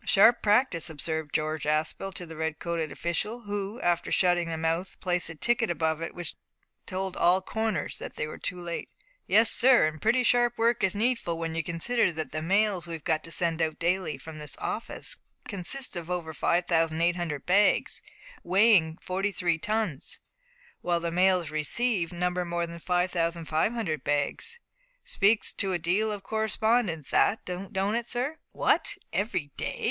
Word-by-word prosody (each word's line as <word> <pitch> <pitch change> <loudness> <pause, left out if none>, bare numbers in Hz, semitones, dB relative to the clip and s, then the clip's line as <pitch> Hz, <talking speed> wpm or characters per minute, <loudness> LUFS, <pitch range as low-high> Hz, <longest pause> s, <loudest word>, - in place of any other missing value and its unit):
"Sharp 225 +4 +5
practice!" 210 -6 +3
observed 160 0 -3
George 155 0 -1
Aspel 155 +5 0
to 180 - -3
the 160 -1 -10
red 160 0 -2
coated 165 -3 -3
official, 210 +8 -2
who, 205 +1 -4
after 175 -1 0
shutting 175 -2 +2
the 165 - -3
mouth, 165 +3 -2
placed 180 -2 0
a 165 - -7
ticket 235 +6 +1
above 160 -2 0
it 165 - -5
which 175 -2 -4 0.5
told 190 0 -3
all 175 +2 +4
corners 215 -3 -2
that - - -7
they - - -2
were 155 - -8
too 180 - -4
late. 170 -1 -5 0.4
"Yes, 220 +4 +5
sir, 250 -6 +6
and 155 0 -3
pretty 245 +3 +3
sharp 240 0 +3
work 235 +1 +2
is 190 0 +2
needful 220 -6 0
when 165 -1 -3
you 165 - 0
consider 180 +6 +1
that 160 -1 -4
the 155 - -3
mails 190 +1 +1
we've 165 -3 -6
got 160 -2 0
to - - -8
send 165 -1 -1
out 160 -1 0
daily 170 -3 0
from 155 +3 -10
this 150 -2 -3
office - - -3 0.3
consist 200 +8 -1
of 170 -1 -5
over 170 -3 -3
5800 170 -2 +1
bags, 200 +3 +3 0.4
weighing 185 -4 +4
forty 195 +2 -2
three 175 -4 0
tons, 210 -7 -2 0.6
while 175 -1 +1
the 170 0 -3
mails 180 -2 +3
received 175 +4 0
number 180 +1 -1
more 170 0 -2
than 170 0 -9
5500 170 - 0
bags. 145 - -1 0.4
Speaks 205 +2 +3
to 195 -1 -1
a - - +2
deal 185 +6 +1
of 205 -2 -5
correspondence 220 - 0
that, 220 - +2
don't 195 +3 -2
it, 235 0 -2
sir?" 260 +6 -2
"What! - - +1 0.2
every 190 -8 -1
day?" - - -3
175 Hz, 165 wpm, -28 LUFS, 165-205 Hz, 0.6 s, sir